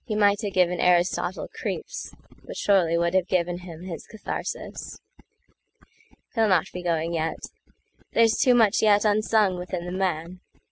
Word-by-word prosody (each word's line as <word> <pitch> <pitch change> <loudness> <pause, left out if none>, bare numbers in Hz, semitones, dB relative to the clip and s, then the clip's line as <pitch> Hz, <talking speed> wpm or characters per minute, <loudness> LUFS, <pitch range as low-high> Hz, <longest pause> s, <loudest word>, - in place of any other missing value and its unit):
He 215 - -2
might 205 0 +3
have 205 -3 -4
given 180 -1 +2
Aristotle 180 +1 +1
creeps, - - -6 0.3
But - - -9
surely 175 -5 +3
would 170 +1 +1
have 185 -1 +2
given 175 -1 0
him 175 -2 -10
his 180 -3 -7
katharsis. 220 - -6 1.3
He'll 225 -2 +2
not 185 -5 +3
be 180 - -5
going 170 -1 -1
yet. 160 -1 -1 0.8
There's 225 -1 +4
too 250 -1 +4
much 225 -3 +4
yetUnsung 210 -2 +3
within 180 -1 -5
the 175 - -5
man. 180 -1 -2
185 Hz, 145 wpm, -25 LUFS, 175-210 Hz, 1.3 s, There's